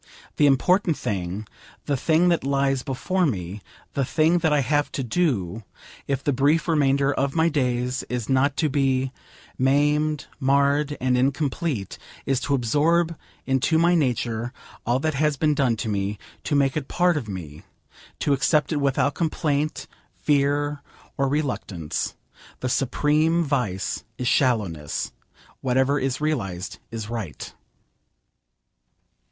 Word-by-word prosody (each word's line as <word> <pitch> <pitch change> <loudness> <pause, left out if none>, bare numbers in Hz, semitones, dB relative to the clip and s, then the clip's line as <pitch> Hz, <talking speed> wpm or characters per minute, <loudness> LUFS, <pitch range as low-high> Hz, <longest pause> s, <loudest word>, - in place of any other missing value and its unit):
The 145 - +5
important 170 +5 +3
thing, 95 +1 -3 0.4
the 145 - 0
thing 160 +6 +3
that 170 - +1
lies 135 -1 +1
before 175 +8 0
me, 95 -4 -4 0.3
the 140 - 0
thing 160 +6 +2
that 160 -2 +1
I 150 -1 +3
have 145 +3 +1
to 135 - -2
do, 115 - 0 0.5
if 140 -2 -1
the 145 - +1
brief 145 +6 +2
remainder 140 -3 +2
of 135 0 -1
my 165 +1 +3
days 125 -3 0
is 125 -3 -3
not 135 +1 +2
to 155 - +2
be 135 -2 +1 0.5
maimed, 150 +3 +2
marred, 140 +2 +2
and 125 0 +1
incomplete, 135 - -1 0.3
is 135 -2 +1
to 140 - 0
absorb 160 +7 +2 0.3
into 135 +4 +2
my 170 +2 +4
nature 120 -6 0 0.4
all 120 +1 +3
that 155 +1 0
has 150 +1 +1
been 150 0 +2
done 135 -6 +1
to 115 - -3
me, 100 0 -1 0.3
to 150 - 0
make 140 -1 +2
it 150 -3 -2
part 180 -1 +2
of 135 -7 -3
me, 80 -6 -7 0.6
to 145 - +2
accept 150 +4 +2
it 155 - +1
without 140 0 +1
complaint, 155 -2 -1 0.3
fear, 145 0 +1 0.3
or 135 - +1
reluctance. 125 - -2 0.5
The 130 - -1
supreme 150 +6 +2
vice 120 - -1
is 125 - -2
shallowness. 105 - 0 0.5
Whatever 130 +2 +2
is 135 -1 -1
realised 105 - -2
is 110 -2 -5
right. 110 -9 -6
140 Hz, 140 wpm, -24 LUFS, 125-150 Hz, 0.6 s, The